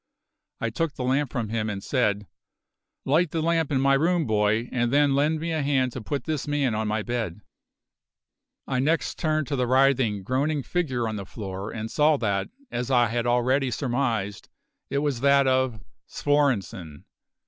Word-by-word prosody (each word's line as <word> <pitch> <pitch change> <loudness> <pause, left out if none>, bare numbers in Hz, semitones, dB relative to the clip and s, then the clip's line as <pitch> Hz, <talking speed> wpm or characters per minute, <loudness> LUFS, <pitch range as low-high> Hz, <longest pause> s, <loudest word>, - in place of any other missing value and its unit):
I 115 - -2
took 160 +5 -2
the 130 - -4
lamp 135 +1 +1
from 115 -3 -3
him 110 -1 -1
and 100 -2 -5
said: 105 -6 0 0.8
"Light 160 +5 +3
the 165 - -2
lamp 165 -1 +1
in 135 - +2
my 140 +1 +3
room, 165 +4 +2
boy, 110 +1 +1
and 120 -1 0
then 145 0 +4
lend 150 +3 +2
me 165 +1 -3
a 160 -1 0
hand 135 -3 +1
to 125 - -6
put 140 +3 -3
this 155 -1 -3
man 145 -5 +1
on 110 0 -1
my 105 0 -1
bed." 115 -6 -3 1.2
I 130 -2 -1
next 155 +5 0
turned 155 -2 0
to 145 - 0
the 125 -2 0
writhing, 130 -6 +3
groaning 140 +6 0
figure 130 -6 -1
on 110 -1 -3
the 100 - -6
floor 95 0 -6
and 110 0 -5
saw 150 0 +3
that, 100 -5 -1 0.2
as 120 +1 -3
I 120 -3 +4
had 120 +1 -1
already 130 +3 +2
surmised, 120 -6 -2 0.4
it - - -1
was 140 -5 -1
that 140 0 +5
of 130 -3 +1 0.3
Svorenssen! 110 - -1
130 Hz, 180 wpm, -25 LUFS, 110-145 Hz, 1.2 s, that